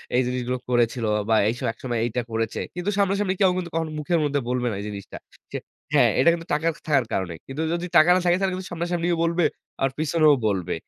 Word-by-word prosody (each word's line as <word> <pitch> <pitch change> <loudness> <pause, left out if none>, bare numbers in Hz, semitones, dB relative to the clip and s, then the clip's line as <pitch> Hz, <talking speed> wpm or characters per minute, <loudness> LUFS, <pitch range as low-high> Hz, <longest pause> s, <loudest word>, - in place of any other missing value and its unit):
এই 125 - +4
জিনিসগুলো 125 0 -2
করেছিল 120 -1 +1 0.2
বা 110 - +5
এইসব 120 +3 -3
একসময় 120 -1 -3
এইটা 120 +1 -1
করেছে।" 115 0 -2 0.2
কিন্তু 180 +3 -2
সামনাসামনি 200 -1 +1
কেউ 190 - +6
কিন্তু 175 -2 -3
কখনো 160 -1 -1
মুখের 165 +3 +1
মধ্যে 145 -1 +1
বলবে 125 -1 0
না - - -3
এই - - -6
জিনিসটা। 100 -1 -8 0.3
সে - - -3 0.4
হ্যাঁ, - - +5
এটা 135 - +6
কিন্তু 165 0 -5
টাকা 155 +2 +1 0.2
থাকার 140 -5 +3
কারণে। 95 -3 -1
কিন্তু 135 +4 -4
যদি 175 +1 -2
টাকা 155 +3 +6
না - - +3
থাকে, 175 0 +4
তাহলে 190 -1 0
কিন্তু 185 0 -7
সামনাসামনি 170 0 -2 0.2
বলবে 170 +1 +1 0.4
আর 135 - +3
পিছনেও 155 0 +4
বলবে। 95 -4 -1
150 Hz, 210 wpm, -24 LUFS, 120-175 Hz, 0.4 s, কেউ